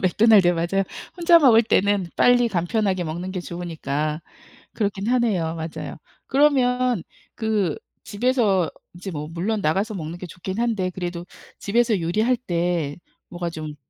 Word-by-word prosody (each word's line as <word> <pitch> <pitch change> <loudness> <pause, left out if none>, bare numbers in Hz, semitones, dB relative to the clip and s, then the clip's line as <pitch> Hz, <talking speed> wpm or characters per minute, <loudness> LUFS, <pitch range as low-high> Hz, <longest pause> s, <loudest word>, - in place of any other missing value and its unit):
맥도날드요. 195 -1 +5
맞아요. 175 +4 0 0.3
혼자 340 -1 +6
먹을 240 -7 +6
때는 205 -4 +2
빨리 245 -1 +4
간편하게 190 0 0
먹는 170 +4 -4
게 185 -1 -4
좋으니까 155 -4 -3 0.5
그렇긴 205 -1 -2
하네요. 215 -10 +1
맞아요. 160 0 -6 0.3
그러면 255 - +2 0.3
그 215 -7 0 0.3
집에서 210 -6 +1 0.2
이제 180 +2 -7
뭐 150 -2 -5
물론 195 +6 -2
나가서 195 +6 0
먹는 165 -2 -6
게 180 - -7
좋긴 185 +3 -6
한데 220 -6 0
그래도 175 -1 -5 0.3
집에서 225 -1 +1
요리할 215 +9 +1
때 175 - -2 0.3
뭐가 175 -1 -4
좀 155 -2 -7
190 Hz, 305 characters per minute, -23 LUFS, 170-225 Hz, 0.5 s, 혼자